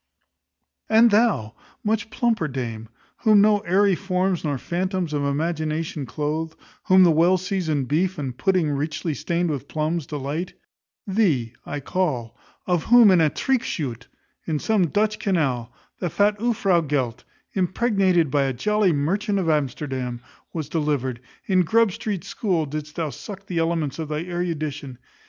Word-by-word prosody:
And 225 Hz, +1 st, +6 dB
thou, 205 Hz, -, +2 dB, 0.3 s
much 220 Hz, +1 st, 0 dB
plumper 225 Hz, -, 0 dB
dame, 115 Hz, -5 st, -5 dB, 0.3 s
whom 215 Hz, -3 st, +5 dB
no 210 Hz, 0 st, +4 dB
airy 195 Hz, +1 st, +3 dB
forms 185 Hz, -1 st, -1 dB
nor 145 Hz, -3 st, -1 dB
phantoms 180 Hz, -, -2 dB
of 145 Hz, -1 st, 0 dB
imagination 155 Hz, 0 st, -2 dB
cloathe; 155 Hz, +5 st, -3 dB, 0.3 s
whom 185 Hz, 0 st, +6 dB
the 175 Hz, -, +6 dB
well 170 Hz, +4 st, +4 dB
seasoned 175 Hz, -7 st, -1 dB
beef, 180 Hz, +7 st, 0 dB
and 135 Hz, -4 st, -4 dB
pudding 185 Hz, -2 st, +1 dB
richly 150 Hz, +3 st, -2 dB
stained 170 Hz, +3 st, -1 dB
with 140 Hz, -1 st, -4 dB
plums, 155 Hz, 0 st, -2 dB
delight: 150 Hz, +4 st, -4 dB, 0.5 s
thee 175 Hz, -, +1 dB
I 145 Hz, 0 st, -4 dB
call: 135 Hz, -9 st, -2 dB, 0.3 s
of 175 Hz, -3 st, 0 dB
whom 240 Hz, -4 st, +7 dB
in 180 Hz, -3 st, +5 dB
a 155 Hz, -, +4 dB
treckschuyte, 150 Hz, -, -2 dB, 0.4 s
in 160 Hz, -2 st, 0 dB
some 195 Hz, +2 st, +1 dB
Dutch 210 Hz, +4 st, 0 dB
canal, 135 Hz, -, 0 dB, 0.3 s
the 175 Hz, -, -1 dB
fat 205 Hz, +5 st, +2 dB
ufrow 200 Hz, -6 st, +2 dB
gelt, 135 Hz, -6 st, -2 dB, 0.3 s
impregnated 185 Hz, -, +2 dB
by 140 Hz, -1 st, +2 dB
a 135 Hz, -, -1 dB
jolly 210 Hz, -, +2 dB
merchant 200 Hz, +8 st, 0 dB
of 175 Hz, -4 st, +1 dB
Amsterdam, 130 Hz, -4 st, -2 dB, 0.3 s
was 155 Hz, -4 st, -4 dB
delivered: 145 Hz, -6 st, -1 dB, 0.2 s
in 185 Hz, -2 st, +3 dB
Grub 225 Hz, +5 st, +3 dB
street 210 Hz, -2 st, -4 dB
school 180 Hz, -7 st, -1 dB
didst 150 Hz, +1 st, -6 dB
thou 160 Hz, -4 st, -2 dB
suck 195 Hz, -, -8 dB
in -, -, -32 dB
the 175 Hz, -2 st, -1 dB
elements 165 Hz, -3 st, -1 dB
of 155 Hz, -2 st, -4 dB
thy 150 Hz, +1 st, -2 dB
erudition. 155 Hz, -7 st, -4 dB
165 Hz, 150 wpm, -23 LUFS, 145-195 Hz, 0.5 s, whom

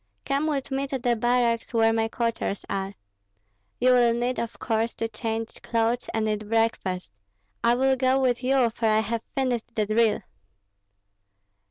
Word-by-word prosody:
Come 280 Hz, +3 st, 0 dB
with 280 Hz, -3 st, -2 dB
me 270 Hz, +1 st, -1 dB
to 270 Hz, -, -2 dB
the 240 Hz, -1 st, +1 dB
barracks, 240 Hz, 0 st, +1 dB
where 225 Hz, 0 st, +4 dB
my 225 Hz, 0 st, +1 dB
quarters 230 Hz, -3 st, -2 dB
are. 195 Hz, 0 st, -3 dB, 0.8 s
You 255 Hz, +1 st, +4 dB
will 240 Hz, -2 st, +4 dB
need, 245 Hz, +2 st, -1 dB
of 235 Hz, -1 st, -4 dB
course, 225 Hz, 0 st, -1 dB
to 225 Hz, -, -2 dB
change 225 Hz, 0 st, -4 dB
clothes 230 Hz, +1 st, 0 dB
and 220 Hz, -1 st, 0 dB
eat 210 Hz, -1 st, -2 dB
breakfast. 225 Hz, -, 0 dB, 0.5 s
I 235 Hz, +1 st, +4 dB
will 265 Hz, +1 st, +3 dB
go 260 Hz, +1 st, +2 dB
with 250 Hz, -1 st, +1 dB
you, 255 Hz, -2 st, +3 dB
for 225 Hz, 0 st, -1 dB
I 215 Hz, 0 st, +4 dB
have 225 Hz, +1 st, -2 dB
finished 245 Hz, -4 st, -1 dB
the 215 Hz, -, +1 dB
drill." 215 Hz, 0 st, +2 dB
230 Hz, 165 wpm, -26 LUFS, 225-250 Hz, 0.8 s, where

